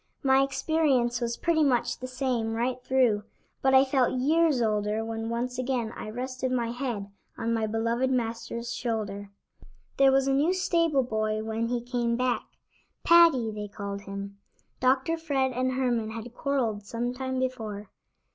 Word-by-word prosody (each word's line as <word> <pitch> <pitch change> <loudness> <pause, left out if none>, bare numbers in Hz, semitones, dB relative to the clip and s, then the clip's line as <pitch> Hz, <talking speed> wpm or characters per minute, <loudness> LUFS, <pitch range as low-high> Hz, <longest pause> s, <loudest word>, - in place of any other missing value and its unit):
My 265 0 +5
experience 270 -3 +1
was 235 0 -2
pretty 330 -2 +2
much 255 -4 +1
the 255 - -5
same 255 -3 -1
right 250 +2 -1
through, 245 -6 +2 0.4
but 265 0 +4
I 265 +1 +7
felt 260 -2 +1
years 310 +1 +3
older 215 -1 0
when 225 0 -4
once 245 +2 -2
again 250 -3 -1
I - - -6
rested 255 +2 -3
my 235 -2 0
head 235 -6 -4 0.3
on 230 0 -1
my 220 -1 0
beloved 230 +4 0
Master's 235 -1 -2
shoulder. 205 -4 -3 0.7
There 270 0 +6
was 270 0 +3
a 270 - +2
new 305 +7 +2
stable 335 -6 +2
boy 215 -2 -1
when 225 +1 -2
he 240 0 -1
came 240 -1 -1
back; 250 0 0 0.6
Paddy, 330 -10 +6
they 210 -1 -5
called 200 0 -6
him. 200 0 -7 0.4
Dr. 265 +6 +2
Fred 275 -5 0
and 255 +1 -1
Herman 245 -4 0
had 230 +1 -7
quarreled 245 -7 -1
some 235 +4 -3
time 260 0 -3
before. 220 -6 -4
245 Hz, 160 wpm, -27 LUFS, 225-265 Hz, 0.7 s, I